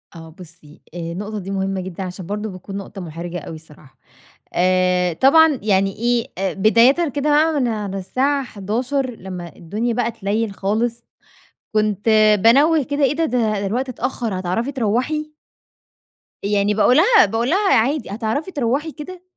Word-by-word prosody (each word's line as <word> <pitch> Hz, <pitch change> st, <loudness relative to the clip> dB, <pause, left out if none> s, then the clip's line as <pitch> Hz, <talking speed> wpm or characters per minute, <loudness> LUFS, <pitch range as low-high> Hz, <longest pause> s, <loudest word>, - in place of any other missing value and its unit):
آه 165 Hz, -1 st, -10 dB
بُصّي 165 Hz, -4 st, -15 dB
آآ 175 Hz, -, -7 dB
النقطة 200 Hz, +6 st, -5 dB
دي 195 Hz, 0 st, -7 dB
مهمة 195 Hz, -1 st, -2 dB
جدًا 185 Hz, +1 st, -6 dB
عشان 185 Hz, 0 st, -7 dB
برضه 210 Hz, +3 st, -4 dB
بتكون 190 Hz, +1 st, -8 dB
نقطة 195 Hz, 0 st, -8 dB
محرجة 170 Hz, +1 st, -6 dB
أوي 160 Hz, -, -8 dB
الصراحة، 150 Hz, -4 st, -16 dB, 0.6 s
آآ 180 Hz, -1 st, +2 dB
طبعًا 295 Hz, -, +5 dB
يعني 195 Hz, -2 st, +1 dB
إيه 240 Hz, +1 st, 0 dB
أ 190 Hz, -1 st, -1 dB
بدايةً 235 Hz, -, +4 dB
كده 285 Hz, +2 st, -2 dB
بقى 305 Hz, +1 st, +3 dB
من 250 Hz, -, +1 dB
على 210 Hz, -4 st, -3 dB
الساعه 275 Hz, +8 st, 0 dB
23:00 250 Hz, +5 st, -2 dB
لما 180 Hz, -6 st, -9 dB
الدنيا 215 Hz, +8 st, -3 dB
بقى 235 Hz, 0 st, -1 dB
تليل 215 Hz, 0 st, -2 dB
خالص 225 Hz, +5 st, -2 dB, 0.7 s
كنت 215 Hz, -1 st, 0 dB, 0.4 s
بانوّة 290 Hz, +7 st, +5 dB
كده 285 Hz, +2 st, -3 dB
إيه 270 Hz, +1 st, +2 dB
ده 330 Hz, -, +1 dB
ده 250 Hz, -4 st, 0 dB, 0.2 s
ده 200 Hz, -, -2 dB
الوقت 250 Hz, +7 st, -2 dB
اتأخر 240 Hz, -5 st, -3 dB
هتعرفي 190 Hz, +9 st, -2 dB
تروُحي؟ 265 Hz, +6 st, -1 dB, 1.1 s
يعني 205 Hz, 0 st, +1 dB
باقول 220 Hz, +4 st, +4 dB
لها 400 Hz, +4 st, +6 dB
باقول 230 Hz, +3 st, -1 dB
لها 390 Hz, +3 st, +2 dB
عادي 265 Hz, +5 st, +1 dB
هتعرفي 225 Hz, -, -3 dB
تروُحي 285 Hz, +2 st, -1 dB
كده 350 Hz, +4 st, -10 dB
220 Hz, 160 wpm, -20 LUFS, 190-265 Hz, 1.1 s, لها